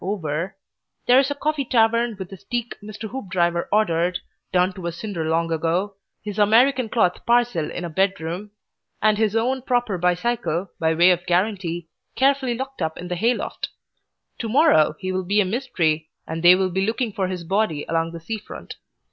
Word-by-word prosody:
over), 180 -1 -3 0.5
there 250 +1 +6
is 270 0 +2
a 285 - -2
Coffee 300 0 -1
Tavern 230 -1 +2
with 190 -1 -7
a - - -7
steak 240 +3 -4
Mr. 215 +1 -7
Hoopdriver 180 -8 -1
ordered, 180 -4 +2 0.3
done 180 +1 +2
to 180 -2 -6
a - - -1
cinder 170 -1 -4
long 165 +1 +1
ago, 170 +5 0 0.3
his 210 0 -5
American 240 +4 +4
cloth 180 -6 +1
parcel 235 -9 +2
in 180 - -5
a - - -4
bedroom, 185 +1 -1 0.5
and 215 0 +3
his 220 -1 +1
own 255 +4 +1
proper 245 -7 0
bicycle, 180 0 0
by 160 -1 +2
way 175 +3 +6
of 175 0 -1
guarantee, 175 -2 0 0.3
carefully 265 -2 +2
locked 270 -2 -6
up 160 -1 -2
in 180 - -7
the 180 - -1
hayloft. 230 +7 -1 0.7
To 225 - -3
morrow 265 - +4
he 185 -1 -4
will 185 0 -1
be 200 +3 +2
a 205 - +4
Mystery, 175 - -1 0.2
and 160 +1 -4
they 175 +1 +8
will 185 0 0
be 190 +2 0
looking 230 -1 -1
for 190 -2 -1
his 180 -2 -4
body 190 -4 0
along 165 0 0
the 170 - -7
sea 215 +7 -5
front. - - -10
195 Hz, 185 wpm, -23 LUFS, 175-230 Hz, 0.7 s, they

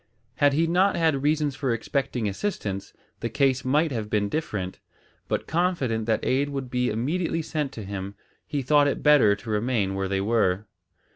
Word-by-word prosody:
Had 145 -2 +4
he 160 +4 +3
not 180 +4 +3
had 160 -5 +2
reasons 150 -1 +1
for 135 -3 -1
expecting 120 -1 -1
assistance, 100 - -3 0.3
the 115 - -2
case 135 +1 +1
might 150 +4 +2
have 110 -4 -3
been 105 -1 +1
different, 100 -10 -3 0.5
but - - -1
confident 145 -10 0
that 110 -1 +1
aid 140 +2 +1
would 135 -3 -5
be 125 0 +1
immediately 160 +9 -1
sent 150 -3 -2
to 110 - -7
him, 100 0 -6 0.3
he 145 -2 -2
thought 145 +2 +4
it 140 - -2
better 145 -9 +6
to 110 +3 -11
remain 105 -2 0
where 95 0 -2
they 95 0 0
were. 100 -2 +1
130 Hz, 180 wpm, -25 LUFS, 105-150 Hz, 0.5 s, better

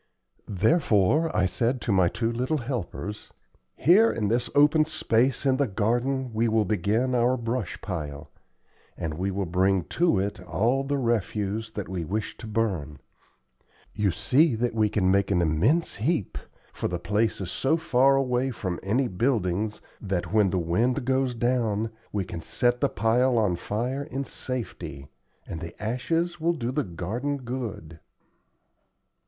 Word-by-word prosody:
Therefore 110 - +2
I 95 - +3
said 120 +7 0
to - - -1
my 95 -3 +4
two 115 +5 -1
little 125 +6 -1
helpers: 115 - -5 0.4
"Here 200 - +5
in 105 -3 -1
this 120 +2 0
open 150 +2 +5
space 130 -3 +1
in 130 -1 +3
the 140 -1 +2
garden 120 +5 0
we 115 +2 +1
will 110 -1 +2
begin 110 +6 0
our 125 +1 +3
brush 115 -3 -3
pile, 75 -6 -5 0.7
and 80 -2 -3
we 90 +5 -2
will 100 0 -2
bring 95 +1 +2 0.2
to 175 - +4
it 100 +2 -2
all 110 +10 0
the 140 +1 -1
refuse 110 -3 -1
that 105 - -4
we 90 -3 -3
wish 100 +7 -3
to 115 - -9
burn. 95 -10 -1 1.0
You 105 -2 +1
see 125 - +3
that 120 +2 -1
we 110 -1 +2
can 95 -3 +2
make 100 0 +2
an 95 -3 +2
immense 85 - +1
heap, 120 - -1 0.3
for - - -2
the 90 - -2
place 105 +5 0
is 95 -2 -4
so 140 +5 +1
far 135 -3 +3
away 130 -1 +1
from 95 -8 -4
any 120 +7 +1
buildings 105 -2 -1 0.2
that, 90 -3 -3
when 105 -3 +4
the 95 - -1
wind 110 +10 0
goes 130 -1 +1
down, 115 -2 0 0.2
we 100 -3 -1
can 85 -2 -6
set 120 +7 0
the - - +3
pile 120 +5 +2
on 105 -6 +2
fire 120 +10 -3
in 140 -2 -4
safety, 115 - -6 0.4
and 80 - -6
the 85 -1 -8
ashes 165 +10 -1
will 170 +2 +2
do 125 -6 -3
the 145 +3 0
garden 110 +11 -3
good." 115 - -6
115 Hz, 160 wpm, -26 LUFS, 95-130 Hz, 1.0 s, Here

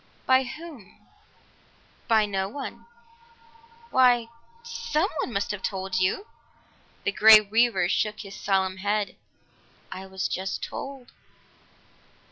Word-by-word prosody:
"By 260 0 +4
whom?" 300 - -10 1.1
"By 220 -3 +4
no 195 -1 -2
one." 280 - -8 1.0
"Why 245 -3 +4 0.3
someone 460 - -2
must 200 -2 -1
have 205 -2 -5
told 190 -1 -2
you!" 185 - 0 0.8
The 200 - 0
Grey 215 +1 +9
Weaver 215 -2 +2
shook 210 +3 -1
his 195 -2 -10
solemn 190 -1 0
head. 205 +1 -1 0.8
"I 190 +1 -7
was 190 0 -3
just 190 +1 -4
told." 270 -3 -7
215 Hz, 105 wpm, -26 LUFS, 190-260 Hz, 1.1 s, Grey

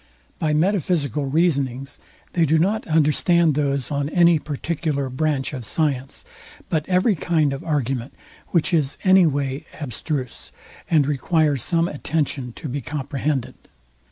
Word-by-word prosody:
By 155 -1 +1
metaphysical 155 -5 0
reasonings, 135 -4 0 0.3
they 165 -2 +2
do 160 +3 +3
not 200 +7 0
understand 160 +1 +3
those 140 -1 -1
on 140 0 -1
any 170 -1 +4
particular 150 -1 -3
branch 145 +1 -1
of 130 -3 -5
science, 135 +2 -2 0.5
but 155 0 -1
every 185 +4 +3
kind 155 -4 +1
of 135 - -6
argument, 135 -5 -2 0.3
which 170 +1 +1
is 150 -4 +1
any 185 -2 +6
way 140 +1 -2
abstruse, 135 -1 -5 0.4
and 155 -4 +4
requires 150 0 +1
some 165 +5 +2
attention 145 -4 -2
to 155 - -7
be 140 +2 -3
comprehended. 140 -1 -3
150 Hz, 130 wpm, -22 LUFS, 135-165 Hz, 0.5 s, any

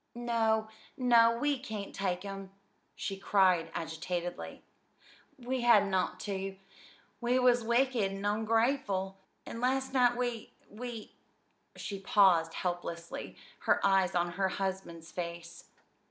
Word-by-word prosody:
"No, 225 -2 +1 0.3
no, 230 -3 +5
we 285 +1 0
can't 215 -6 -6
take 185 -1 -2
'em," 195 -1 -6 0.5
she 195 - -4
cried 185 -4 +3
agitatedly. 170 +2 -4 0.7
"We 255 0 -3
hadn't 210 -5 +5
ought 185 -1 0
to. 195 -1 -4 0.6
We 245 +1 +2
was 245 -2 +4
wicked 235 -3 +2
and 195 +1 -5
ongrateful, 215 -2 +1 0.3
and 230 - -7
last 265 +1 0
night 245 -2 +4
we 245 -3 -3 0.2
we 230 0 -7 0.3
" - - -43
She 200 -2 -5
paused 185 -5 +4
helplessly, 175 -2 -4 0.2
her - - +2
eyes 190 -2 +3
on 175 0 +1
her 190 +2 0
husband's 185 -4 -4
face. 170 -1 -6
200 Hz, 125 wpm, -31 LUFS, 185-240 Hz, 0.7 s, no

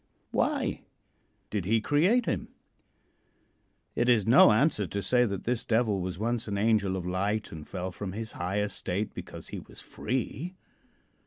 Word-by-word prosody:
Why - - 0 0.7
did 100 -4 -1
he 110 +4 +3
create 175 - +3
him? - - -1 1.5
It 120 +1 +1
is 110 -5 +4
no 120 +1 +8
answer 110 - +2
to 100 - -3
say 125 +5 +4
that 100 -4 -3
this 120 -1 -1
Devil 110 -4 +1
was 90 -1 -4
once 115 +2 -1
an 100 -1 -2
angel 100 -3 +2
of 90 - -5
light 100 +4 -1
and 80 -2 -9
fell 95 0 -4
from 95 +1 -6
his 110 +1 -5
high 95 +4 -2
estate 100 0 -2
because - - -8
he - - -5
was - - -13
free. 130 - -3
105 Hz, 160 wpm, -29 LUFS, 95-120 Hz, 1.5 s, no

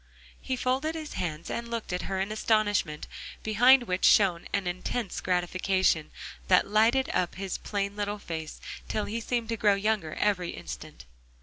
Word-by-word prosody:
He 260 - -2
folded 260 +6 0
his 310 -2 -6
hands 165 -2 -4
and 235 0 -4
looked 230 -5 -4
at 180 - -1
her 190 -1 -1
in 195 +2 -1
astonishment, 210 -8 +1 0.4
behind 245 +4 +6
which 185 -5 -2
shone 180 -5 +5
an 200 -2 0
intense 185 +4 -3
gratification, 185 -2 +1 0.4
that - - +5
lighted 225 +6 +3
up 180 -1 0
his 190 -1 -4
plain 200 -1 -3
little 205 0 -2
face 160 -5 -6 0.3
till 215 - -1
he 230 +3 -3
seemed 235 0 -2
to 230 - -1
grow 205 -1 +4
younger 200 -5 -1
every 185 -4 0
instant. - - -9
205 Hz, 165 wpm, -28 LUFS, 180-230 Hz, 0.4 s, behind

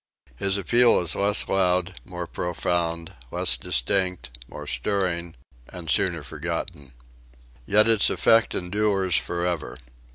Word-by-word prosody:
His 95 +9 -1
appeal 120 +5 +3
is 85 -1 +1
less 100 +1 +2
loud, 90 -2 +1
more 90 -1 -6
profound, 85 -1 -2 0.2
less - - +4
distinct, 90 +1 -2
more - - -9
stirring 90 -4 -2 0.3
and 85 -4 -5
sooner - - +1
forgotten. 80 -2 -6 0.7
Yet 105 +1 +4
its 115 -2 +5
effect 115 0 +3
endures 95 0 0
forever. 85 -2 -2
90 Hz, 110 wpm, -24 LUFS, 85-100 Hz, 0.7 s, its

